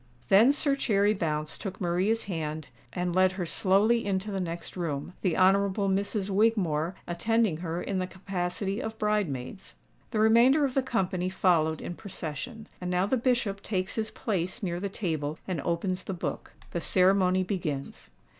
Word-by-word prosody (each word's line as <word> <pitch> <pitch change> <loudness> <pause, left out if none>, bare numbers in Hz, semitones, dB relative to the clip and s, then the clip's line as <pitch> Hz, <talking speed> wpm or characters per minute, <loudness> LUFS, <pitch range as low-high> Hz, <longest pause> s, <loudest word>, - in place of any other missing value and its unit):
Then 220 +7 +7
Sir 285 -1 +2
Cherry 210 -5 +2
Bounce 155 -5 -2
took 190 -3 -6
Maria's 185 +6 +1
hand, 155 -5 -4 0.2
and 180 -1 -2
led 185 0 +4
her 185 -2 -3
slowly 205 +7 +3
into 200 +1 -2
the 195 - -2
next 170 -2 -5
room, 165 -2 -3
the 180 -4 0
Honourable 195 +1 +3
Misses 200 +1 -1
Wigmore 190 -6 +1
attending 210 +1 +1
her 170 0 -4
in 195 -2 -2
the 185 - -2
capacity 190 +2 -3
of 220 -2 -5
bridemaids. 195 - -2 0.3
The 220 - -3
remainder 235 +7 +5
of 265 - -2
the 270 - +2
company 185 -7 -1
followed 165 -4 +2
in - - -5
procession. 200 - -6
And 180 - -3
now 180 +1 +2
the 235 - +1
Bishop 235 -5 0
takes 185 -3 -2
his 220 -1 -2
place 190 +1 -3
near 175 -2 -2
the 200 +2 -3
table, 160 -6 -3
and 180 -6 -2
opens 180 +3 -1
the 195 - -4
book. 170 - -5 0.2
The 170 - -2
ceremony 185 0 +4
begins. 155 - -4
190 Hz, 165 wpm, -28 LUFS, 175-210 Hz, 0.3 s, Then